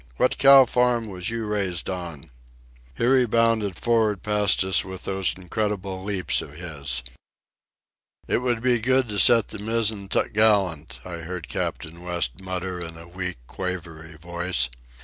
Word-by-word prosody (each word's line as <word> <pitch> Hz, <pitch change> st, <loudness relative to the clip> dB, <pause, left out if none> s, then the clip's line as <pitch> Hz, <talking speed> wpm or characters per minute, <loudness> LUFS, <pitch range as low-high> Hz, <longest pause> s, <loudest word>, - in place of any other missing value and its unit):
What 130 Hz, -, +1 dB
cow 135 Hz, -1 st, +8 dB
farm 120 Hz, -2 st, +1 dB
was 90 Hz, +1 st, -4 dB
you 115 Hz, -1 st, -3 dB
raised 100 Hz, -5 st, -2 dB
on?" 85 Hz, -8 st, -6 dB, 0.6 s
Here 125 Hz, +3 st, +3 dB
he 125 Hz, -, +2 dB
bounded 115 Hz, -4 st, +2 dB
for'ard 110 Hz, -4 st, +1 dB
past 105 Hz, -2 st, +2 dB
us 95 Hz, -4 st, +3 dB
with 95 Hz, 0 st, -8 dB
those 95 Hz, -1 st, -1 dB
incredible 95 Hz, 0 st, -3 dB
leaps 100 Hz, -2 st, 0 dB
of 70 Hz, -, -10 dB
his. 75 Hz, -6 st, -3 dB, 1.2 s
"It -, -, +1 dB
would 120 Hz, -2 st, -1 dB
be 125 Hz, -2 st, +3 dB
good 130 Hz, +2 st, +2 dB
to 105 Hz, -1 st, -2 dB
set 115 Hz, -1 st, +5 dB
the -, -, -6 dB
mizzen 110 Hz, -2 st, -1 dB
topgallant," 100 Hz, -10 st, +1 dB
I 90 Hz, -2 st, -6 dB
heard 85 Hz, 0 st, -6 dB
Captain 85 Hz, +2 st, -4 dB
West 85 Hz, -3 st, -2 dB
mutter 95 Hz, -1 st, -4 dB
in 85 Hz, -1 st, -7 dB
a 85 Hz, +1 st, -12 dB
weak, 90 Hz, +1 st, -4 dB
quavery 85 Hz, -2 st, -6 dB
voice. 85 Hz, -5 st, -1 dB
95 Hz, 150 wpm, -24 LUFS, 85-110 Hz, 1.2 s, cow